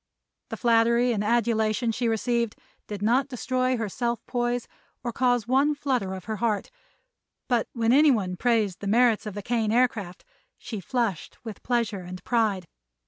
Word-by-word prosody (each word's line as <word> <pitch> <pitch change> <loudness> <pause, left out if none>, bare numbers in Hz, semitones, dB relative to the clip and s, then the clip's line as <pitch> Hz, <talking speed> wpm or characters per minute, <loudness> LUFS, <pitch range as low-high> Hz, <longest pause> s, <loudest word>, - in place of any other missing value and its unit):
The - - -5
flattery 235 +1 +3
and 210 -3 -1
adulation 225 0 +1
she 235 +2 -1
received 235 0 0 0.3
did 205 -1 -5
not 250 +5 +3
destroy 255 -1 -1
her 225 -2 -2
self 235 +3 -3
poise 240 -1 -1 0.4
or 240 - -2
cause 245 -2 +1
one 275 +4 +3
flutter 250 -10 -1
of 185 - -9
her 220 0 -3
heart, 210 -1 -1 0.8
but 240 -4 +1
when 230 -1 +2
anyone 245 -11 +4
praised 220 -4 +1
the 200 - -5
merits 230 0 +3
of 205 - -6
the 205 - -5
Kane 225 -2 0
Aircraft, 220 -7 0 0.3
she 220 -4 -6
flushed 225 -5 -2
with 220 -3 -7
pleasure 230 -5 -1
and 180 +1 -9
pride. 215 -6 +1
230 Hz, 160 wpm, -26 LUFS, 210-245 Hz, 0.8 s, anyone